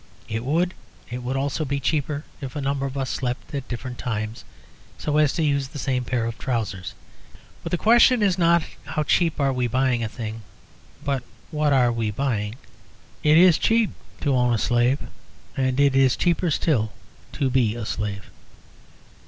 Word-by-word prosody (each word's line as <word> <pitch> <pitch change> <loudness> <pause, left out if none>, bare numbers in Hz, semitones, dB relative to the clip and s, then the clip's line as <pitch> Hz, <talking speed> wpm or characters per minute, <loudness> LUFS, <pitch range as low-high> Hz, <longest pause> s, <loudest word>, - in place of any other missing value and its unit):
So - - -6
it 115 - -2
would. 170 +7 +1 0.4
It 125 +1 -4
would 125 +2 -3
also 140 +3 -1
be 140 -1 -2
cheaper 145 +1 -1 0.2
if 130 -3 -6
a 145 - -2
number 140 0 -1
of 135 +1 -6
us 135 -1 -2
slept 125 +2 -3
at 140 -2 -4
different 125 0 -6
times, 110 -2 -3 0.5
so 150 0 -1
as 150 -2 +4
to 165 - 0
use 140 -2 +1
the 145 - -9
same 130 -2 -1
pair 120 -1 0
of 115 0 -5
trousers. 110 -8 -3 0.7
But - - -5
the 175 - +1
question 235 +3 +5
is 195 -3 +3
not 170 -2 +4 0.2
how 155 - -2
cheap 165 +1 +2
are 135 -1 +2
we 125 -1 0
buying 125 0 +1
a 110 - -2
thing, 110 0 -6 0.6
but 140 -2 0 0.3
what 150 -2 +1
are 125 -3 +4
we 115 -2 -1
buying? 105 -2 -1 0.7
It 150 +1 +5
is 175 -2 +6
cheap 225 -1 +3 0.3
to 140 - +1
own 125 -2 +3
a - - +1
slave. 120 +4 +2 0.6
And 130 0 0
it 140 -1 +4
is 135 -1 +4
cheaper 175 0 +1
still 125 -8 +1 0.4
to 135 -2 0
be 120 -4 +2
a 120 -2 -4
slave. 105 -2 -4
135 Hz, 185 wpm, -24 LUFS, 120-150 Hz, 0.7 s, is